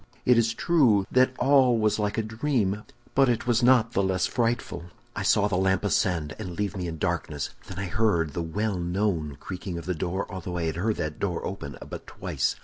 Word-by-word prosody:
It 125 - +6
is 115 -1 +2
true 125 - +3
that 130 0 +3
all 130 -2 +4
was 110 -1 +1
like 105 0 -1
a 110 - +1
dream, 110 -3 -1 0.3
but 135 -1 +4
it 120 - 0
was 120 -1 +2
not 120 -2 +5
the 100 - +1
less 95 -1 +1
frightful. 120 -7 -1 0.3
"I - - -3
saw 105 0 +3
the 100 - -1
lamp 95 0 +2
ascend, 90 -7 0
and 90 -5 -6
leave 105 0 -1
me 90 -2 -3
in 80 -1 -5
darkness; 80 -4 -2 0.2
then 95 - -8
I 95 - -2
heard 85 -6 +1
the 85 - -2
well 95 +4 -2
known 85 -5 -1
creaking 90 -2 -6
of 85 - -7
the 90 - -1
door 90 +3 -2
although 90 -2 -5
I 85 - -1
had 80 0 -2
heard 105 +4 0
that 75 0 -4
door 90 -4 -2
open 70 -8 -6
but - - -8
twice. - - -2
100 Hz, 215 wpm, -26 LUFS, 85-115 Hz, 0.3 s, It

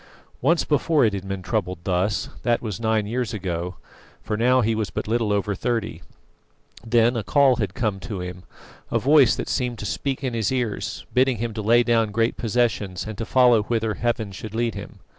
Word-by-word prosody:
Once 170 0 +3
before 150 -1 +2
it 105 - +1
had 95 -1 -5
been 95 -1 -4
troubled 90 -2 -2
thus; 95 +2 0
that 120 -1 +1
was 105 -6 -5
nine 110 -2 +1
years 115 +1 -2
ago, 90 -2 -3 0.5
for 110 - -2
now 125 +3 +3
he 115 0 +1
was 110 -2 -2
but - - -4
little 115 -1 0
over 100 0 0
thirty. 110 -4 -2 0.8
Then 120 +1 +3
a 115 - 0
call 135 +1 +4
had - - -2
come 110 -6 -1
to 105 -2 -6
him, 90 0 -6 0.5
a - - +1
voice 140 -1 +5
had - - -4
seemed 125 -3 -1
to 105 - -6
speak 135 +7 -2
to 130 -2 -2
his 115 -1 -1
ears 125 -5 -3
bidding 130 -1 +3
him 115 +1 -3
to 110 - -4
lay 120 +3 +4
down 115 -2 +2
great 115 +3 0
possessions 110 -5 -1
to 115 - -4
follow 125 -4 +5
whither 110 0 -1
Heaven 115 -3 -2
should 105 +3 -8
lead 115 -1 0
him. - - -9
115 Hz, 200 wpm, -23 LUFS, 105-120 Hz, 0.8 s, voice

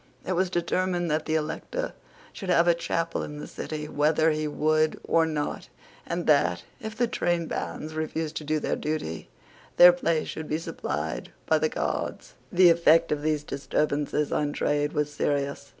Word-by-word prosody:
It - - -2
was 185 +1 +1
determined 175 0 0
that 155 +1 -1
the 155 - +1
Elector 160 - -3 0.4
should 195 -4 -7
have 175 -1 +4
a 175 - +6
chapel 165 0 -2
in 150 - -6
the 150 - -6
City 150 -1 -5
whether 155 +2 +2
he 155 0 -1
would 155 +1 +1
or 165 -1 +3
not, 150 -2 -3 0.4
and 170 0 -2
that, 90 - +3 0.2
if 220 0 -7
the 240 - +3
trainbands 170 -5 -2
refused 155 0 -3
to - - -4
do 155 +1 0
their - - -1
duty, 150 - -4 0.5
their 175 0 +10
place 170 -2 0
should 160 -1 -6
be 155 - +1
supplied 75 - -4 0.2
by - - +3
the - - +1
Guards. - - -3 0.2
The 180 -1 +7
effect 165 0 +4
of 150 -1 0
these 150 -1 0
disturbances 145 +1 -1
on 145 -1 0
trade 145 0 0
was 150 0 -1
serious. 140 -1 -1
155 Hz, 170 wpm, -27 LUFS, 150-170 Hz, 0.5 s, their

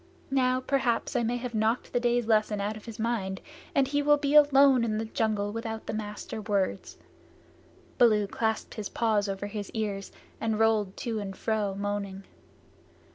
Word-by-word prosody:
Now 255 -1 +2
perhaps 260 -2 0
I 245 - +3
may 240 +1 0
have 245 0 -5
knocked 220 +2 0
the 245 - +2
day's 240 -1 +1
lesson 215 -2 +2
out 205 +2 -2
of 215 - -11
his 230 -2 -8
mind, 220 -4 -2 0.4
and 275 -2 +4
he 290 +1 +1
will 295 0 +4
be 285 0 -1
alone 280 -4 +6
in 215 -2 0
the 220 - -2
jungle 215 -2 -1
without 225 0 -5
the - - -4
Master 215 0 -5
Words." 200 -3 -2 1.0
Baloo 215 -4 +5
clasped 220 +2 -2
his 215 -3 -5
paws 215 -3 +1
over 195 +1 -3
his 205 -1 -5
ears 205 -3 -3 0.3
and 220 -1 0
rolled 215 -3 +2
to 230 -5 -3
and 195 -2 -6
fro 210 -3 -1
moaning. 200 -1 -3
220 Hz, 175 wpm, -28 LUFS, 205-240 Hz, 1.0 s, alone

